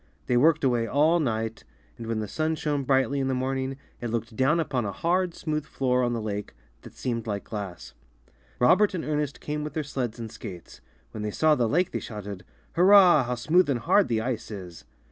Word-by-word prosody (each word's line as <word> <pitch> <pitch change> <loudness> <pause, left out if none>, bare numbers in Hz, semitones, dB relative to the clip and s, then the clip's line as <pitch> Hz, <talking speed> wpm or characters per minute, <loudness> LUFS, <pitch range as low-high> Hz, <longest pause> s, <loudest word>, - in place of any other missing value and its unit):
They 125 - +1
worked 155 +5 +4
away 120 -3 +2
all 150 +8 +3
night, 115 -5 -2 0.3
and 115 - -8
when 115 -1 -1
the 105 - -4
sun 155 +8 -1
shone 145 -3 -2
brightly 135 +1 +2
in 135 - 0
the 130 - 0
morning, 130 +1 -2 0.2
it 120 - -3
looked 115 0 -3
down 135 +7 +2
upon 135 -6 -1
a 100 - -2
hard, 175 - 0
smooth 155 -1 -2
floor 130 -3 0
on 120 -1 +1
the 115 - -2
lake, 105 - -4 0.3
that - - -13
seemed 115 -3 -3
like 100 -2 -3
glass. 100 -5 -7 0.6
Robert 185 +11 +4
and 170 - -3
Ernest 150 -2 -2
came 150 0 -4
with 150 -1 -5
their 155 - -2
sleds 125 -5 -3
and 115 -2 -7
skates. 90 -3 -10 0.3
When 110 - -6
they 105 - -2
saw 155 +8 +3
the 120 -6 +1
lake 180 +6 +1
they - - -2
shouted, 105 -4 -7 0.3
'^Hurrah! 180 -5 +7
how 125 - -1
smooth 155 +7 +3
and 135 - +2
hard 200 - +3
the 115 -2 0
ice 120 -1 -3
is!" 90 -5 -9
130 Hz, 210 wpm, -26 LUFS, 115-150 Hz, 0.6 s, ^Hurrah